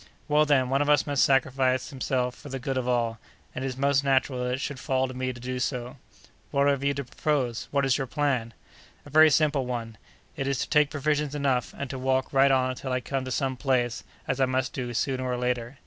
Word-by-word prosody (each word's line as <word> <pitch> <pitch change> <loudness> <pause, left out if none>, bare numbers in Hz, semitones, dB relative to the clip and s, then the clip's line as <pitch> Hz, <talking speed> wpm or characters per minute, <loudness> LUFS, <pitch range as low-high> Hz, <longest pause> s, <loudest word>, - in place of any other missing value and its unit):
"Well, 150 0 +3
then, 130 -3 +3
one 135 +1 +2
of 145 - +1
us 145 -1 +4
must 145 -2 +2
sacrifice 130 -1 +2
himself 130 -2 -1
for 145 - -12
the 135 - -4
good 135 +1 -3
of 130 -1 -1
all, 115 -2 0 0.3
and 130 - -4
it - - -1
is 130 -1 -5
most 140 0 +2
natural 135 -2 +1
that 125 0 -1
it - - -7
should 140 -1 -4
fall 130 0 0
to 130 - -7
me 130 0 -2
to 120 - -10
do 125 +1 -4
so." 125 +1 -3 0.5
"What 140 0 +2
have 140 -1 +1
you 140 0 +1
to 140 - -3
propose? 125 -2 -1
What 140 -1 +1
is 135 +2 +2
your 135 - -2
plan?" 130 -6 -1 0.5
"A 145 - -12
very 155 +2 +7
simple 145 -3 +2
one! 115 -3 -5 0.4
It 135 -3 -3
is 140 -1 0
to - - -3
take 150 -2 +4
provisions 150 0 -1
enough, 135 -4 0
and 140 - -4
to 130 - -5
walk 130 +1 0
right 135 0 +5
on 130 -1 +2
until 130 +1 -5
I 125 - +1
come 135 +1 -3
to 130 - -5
some 135 0 -1
place, 120 -3 0 0.2
as 135 0 -1
I - - +6
must 130 0 -1
do, 125 -2 -4
sooner 130 +1 -1
or 125 -1 -1
later. 125 +1 -2
130 Hz, 240 wpm, -27 LUFS, 125-140 Hz, 0.5 s, very